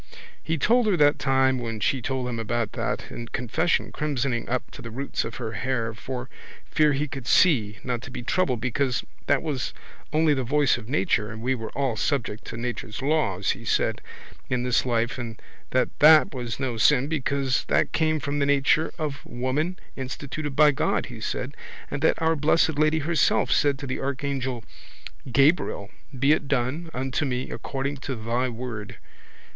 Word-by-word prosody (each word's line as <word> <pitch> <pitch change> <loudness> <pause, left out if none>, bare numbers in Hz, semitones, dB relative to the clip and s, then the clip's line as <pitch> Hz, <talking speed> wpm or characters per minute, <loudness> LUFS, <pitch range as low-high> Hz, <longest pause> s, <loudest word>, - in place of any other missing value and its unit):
He 160 - -1
told 235 - +3
her 195 -4 +3
that 145 -1 +4
time 130 -1 +3
when 115 -2 -4
she 130 +5 +1
told 130 0 -2
him 120 -2 -3
about 115 -1 -1
that - - -3
in 115 - -6
confession, 125 +9 0
crimsoning 135 -5 -1
up 125 +1 -2
to - - -10
the 115 - -7
roots 135 +5 -3
of 115 - -6
her 115 -3 -4
hair 115 -1 -1
for 125 +3 -6 0.4
fear 150 -2 +3
he 145 +2 -1
could 135 -3 -7
see, 110 - +4
not 125 -2 -2
to 135 - -9
be 125 -1 -6
troubled 130 -4 +1
because 125 +2 0 0.2
that - - +3
was 140 -6 -3 0.4
only 155 0 +3
the 135 -2 -1
voice 145 +1 +3
of 120 -1 -9
nature 130 - +1
and 110 0 -8
we 130 +2 +2
were 115 -3 -4
all 135 -5 0
subject 115 -3 -1
to - - -6
nature's 120 0 -4
laws, 135 - +1
he - - -6
said, - - +1 0.5
in 125 -1 0
this 125 0 +2
life 120 +2 0
and 115 -3 -6 0.3
that 130 - +2
that 155 0 +7
was 120 -2 -4
no 130 -4 -2
sin 135 +3 +4
because 140 -3 0
that - - +2
came 155 -1 +1
from 145 +1 -2
the 140 - +2
nature 145 +3 +3
of 150 -3 -4
woman 145 +9 -2 0.2
instituted 140 +2 -5
by 150 0 +7
God, 135 - 0
he - - -9
said, - - -3 0.4
and 145 - -3
that 160 - +3
Our 160 0 +2
Blessed 155 0 +2
Lady 155 +1 +3
herself 160 +1 +2
said 145 -2 +3
to 140 - -7
the 130 - -3
archangel 135 -3 -2 0.7
Gabriel 135 - +2 0.3
be 135 +3 +3
it 150 -2 +2
done 140 +5 -1
unto 130 +2 -2
me 125 -2 -2
according 140 +1 -3
to 130 0 -4
Thy 120 +3 -1
Word. 115 -3 -6
130 Hz, 185 wpm, -25 LUFS, 120-145 Hz, 0.7 s, that